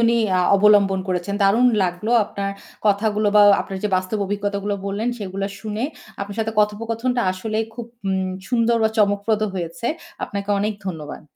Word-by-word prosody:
উনি 235 0 +3 0.4
অবলম্বন 200 -2 +4
করেছেন। 185 +2 -1
দারুণ 225 +6 +4 0.2
লাগলো 180 +5 -2
আপনার 200 0 -4 0.4
কথাগুলো 210 +1 +2
বা 210 - +8 0.2
আপনার 195 -1 -5
যে - - +2
বাস্তব 185 +3 -2
অভিজ্ঞতাগুলো 205 0 -2
বললেন 205 +4 -1
সেগুলা 195 -1 -3
শুনে 215 +2 -3 0.4
আপনার 200 +1 -5
সাথে 225 0 -1
কথোপকথনটা 230 +4 0
আসলেই 220 +3 -2
খুব 235 -1 -6 0.2
উম 190 -1 0 0.2
সুন্দর 235 -1 +2
বা 220 - +4
চমকপ্রদ 205 +1 +2
হয়েছে। 170 +4 -4 0.4
আপনাকে 200 0 -5
অনেক 210 +2 0
ধন্যবাদ। 160 -5 -6
205 Hz, 150 wpm, -21 LUFS, 195-220 Hz, 0.4 s, বা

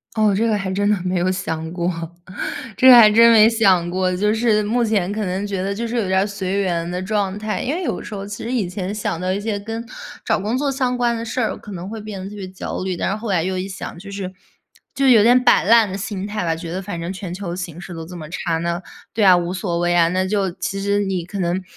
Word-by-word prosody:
哦， 215 -2 +3
这 225 +3 +1
个 215 - +2
还 195 -2 -2
真 205 +2 0
的 - - +4
没 185 0 -1
有 180 +1 +1
想 160 -3 -3
过， 175 0 -1 0.9
这 260 - +3
个 255 - +11
还 220 -3 +9
真 230 +2 +7
没 220 0 +7
想 195 -7 +3
过。 185 +1 0
就 210 +4 +1
是 220 -2 +2
目 235 +3 +1
前 205 -4 0
可 210 0 -2
能 190 +2 -2
觉 195 -2 -3
得 200 +1 -2
就 230 +2 -3
是 240 - -3
有 220 -5 0
点 190 0 +2
儿 200 - +1
随 200 -1 -3
缘 170 -3 -1
的 180 +1 -3
状 200 0 -1
态， 215 0 -3
因 275 +5 -1
为 365 - -3
有 - - -2
时 - - -8
候 195 0 -5
其 205 +2 -7
实 235 - -3
以 215 -8 0
前 185 +2 -4
想 205 -5 -2
到 185 +1 -1
一 200 - -2
些 210 -1 -2
跟 225 +3 -5 0.4
找 - - +2
工 215 +5 -1
作 285 -1 0
相 255 -2 -1
关 240 -1 +1
的 230 - -4
事 235 +2 -3
儿， 225 - 0
可 210 - -11
能 180 +1 -6
会 220 +1 -6
变 210 -2 -7
得 195 - -6
特 210 - -10
别 190 -2 -6
焦 185 0 -5
虑。 185 -1 -2
但 - - -2
是 200 - -1
后 220 -1 -5
来 175 -4 +2
又 185 +1 -2
一 185 +1 -3
想， 190 -2 -7
就 200 +2 -10
是 195 -2 -5 0.6
就 275 -1 +2
有 225 -4 +7
点 245 +2 +5
摆 - - +5
烂 225 0 +5
的 190 - -4
心 200 -1 -4
态 210 -3 -3
吧。 165 -1 +1
觉 165 0 -7
得 190 +2 -3
反 185 -3 -5
正 170 +2 -4
全 185 -2 -6
球 180 -2 -5
形 175 -2 -6
势 185 -2 -8
都 165 0 -6
这 180 - -10
么 160 -3 -8
差， 165 -1 -2
那 170 +2 -2 0.3
对 215 -2 +2
啊， 185 -1 +8
无 175 +1 0
所 180 -3 -2
谓 175 0 +1
啊。 165 -1 +5
那 185 +2 0
就 195 -1 0
其 190 +2 -4
实 200 0 +1
你 185 -3 -2
可 200 +3 -7
能 180 +1 0
195 Hz, 305 characters per minute, -20 LUFS, 180-215 Hz, 0.9 s, 个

